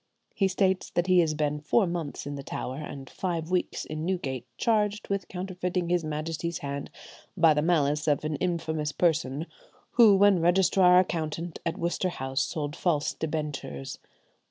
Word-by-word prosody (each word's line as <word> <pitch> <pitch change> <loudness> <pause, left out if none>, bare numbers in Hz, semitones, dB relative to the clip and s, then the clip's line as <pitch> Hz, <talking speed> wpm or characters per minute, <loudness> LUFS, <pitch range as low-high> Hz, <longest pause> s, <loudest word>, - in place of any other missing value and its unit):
He 195 - +2
states 190 0 +1
that 175 - 0
he 185 -1 +5
has 160 -3 +2
been 150 -1 -1
four 170 +9 +2
months 170 -4 -4
in 145 - -4
the 140 - -5
Tower, 130 -1 -5
and 140 -3 -7
five 170 0 -3
weeks 180 -1 -1
in 155 0 -5
Newgate, 135 -9 -2
charged 210 -2 +1
with 200 -3 -2
counterfeiting 180 -1 -3
his 175 -1 +2
Majesty's 155 +2 -3
hand, 140 0 -5 0.5
by 165 -2 +6
the 150 - +1
malice 150 -3 +1
of 145 0 +1
an 155 0 -1
infamous 160 -3 -1
person 155 -3 0 0.5
who, 220 -4 +7
when 195 -2 +5
Registrar 180 +1 +5
Accountant 165 -2 -1
at 165 - -2
Worcester 175 +2 -1
House, 135 -5 -2
sold 150 -1 -3
false 160 -5 0
debentures." 150 - -4
165 Hz, 160 wpm, -27 LUFS, 150-180 Hz, 0.5 s, who